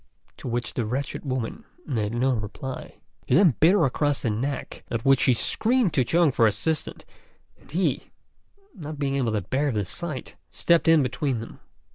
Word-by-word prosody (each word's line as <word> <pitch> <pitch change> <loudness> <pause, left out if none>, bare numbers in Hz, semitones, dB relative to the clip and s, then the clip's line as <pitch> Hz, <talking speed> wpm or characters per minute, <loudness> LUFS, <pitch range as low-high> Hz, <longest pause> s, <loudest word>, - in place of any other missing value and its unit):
to - - -9
which 120 +1 -2
the 120 - -1
wretched 130 +6 -3
woman 130 -5 -3 0.2
made 110 -7 -1
no 130 +3 +1
reply. 120 +4 -6 0.3
He 125 - +3
then 175 -5 +6
bit 165 +4 +6
her 190 -7 +4
across 145 +2 0
the 115 - +1
neck, 135 +7 -4
at 115 -1 -3
which 135 -1 +5
she 125 - +3
screamed 230 - +1
to 130 - +3
Chung 165 +4 +3
for 115 -3 +4
assistance, 155 +9 -2 0.5
and - - -22
he, 175 +6 -1 0.6
not 155 - -7
being 140 -1 -1
able 125 -5 0
to 105 - 0
bear 135 +9 0
the 105 -4 -1
sight, 155 - -6 0.2
stepped 170 -1 +2
in 165 -3 +6
between 125 0 -1
them. 115 - -9
135 Hz, 180 wpm, -25 LUFS, 120-155 Hz, 0.6 s, then